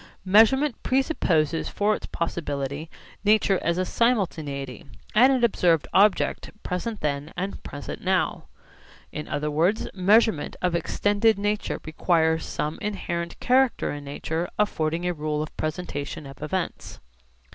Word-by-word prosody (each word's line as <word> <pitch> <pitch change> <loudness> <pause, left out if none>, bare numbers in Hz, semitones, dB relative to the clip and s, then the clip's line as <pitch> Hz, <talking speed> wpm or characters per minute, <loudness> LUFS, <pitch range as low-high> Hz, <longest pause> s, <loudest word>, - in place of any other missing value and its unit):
Measurement 225 +8 +4
presupposes 170 - +1
for 210 +1 +1
its - - -8
possibility 145 -2 -3 0.3
nature 210 -2 +3
as 170 +1 0
a 185 - +1
simultaneity, 160 - -1 0.3
and 250 +5 +6
an 255 -2 +1
observed 175 -8 +3
object 205 +1 +3
present 205 +4 -3
then 145 +1 -2
and 190 +2 -4
present 145 0 -7
now. 185 -3 0 0.7
In 150 - -6
other 150 +1 -2
words, 175 +9 +1
measurement 200 -2 +3
of 180 -1 0
extended 205 +5 +2
nature 205 +1 -1
requires 160 0 +1
some 150 +1 -3
inherent 170 -4 -3
character 255 0 +2
in 145 0 -6
nature 160 +4 -3
affording 165 -5 0
a 180 - +1
rule 150 -1 -2
of 155 - -9
presentation 155 -2 -4
of 135 0 -11
events. 185 +3 -4
175 Hz, 130 wpm, -25 LUFS, 155-210 Hz, 0.7 s, and